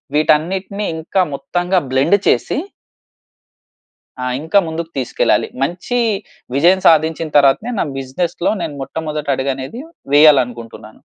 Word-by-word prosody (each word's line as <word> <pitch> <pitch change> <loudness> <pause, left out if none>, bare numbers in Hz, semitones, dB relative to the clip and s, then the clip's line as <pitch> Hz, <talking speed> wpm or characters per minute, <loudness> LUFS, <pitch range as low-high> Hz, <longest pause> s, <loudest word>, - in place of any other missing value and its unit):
వీటన్నిటిని 185 +7 +1
ఇంకా 170 +4 0
మొత్తంగా 175 +6 -1
బ్లెండ్ 140 +10 +3
చేసి - - +1 1.6
ఆ! - - -2 0.2
ఇంకా 165 +6 +3
ముందుకు 160 +1 -5
తీసుకెళ్ళాలి. 130 - +1 0.2
మంచి 175 - -2 0.6
విజయం 175 +6 +4
సాధించిన 160 0 +3
తరువాతనే 140 - +3
నా - - +1
బిజినెస్‌లో 170 +7 -2 0.3
మొట్టమొదటి 150 0 -5
అడుగ‌నేది 135 - -4 0.3
వేయాలి 145 -2 +7
అనుకుంటున్నాను. 115 -2 -11
155 Hz, 100 wpm, -17 LUFS, 135-175 Hz, 1.6 s, వేయాలి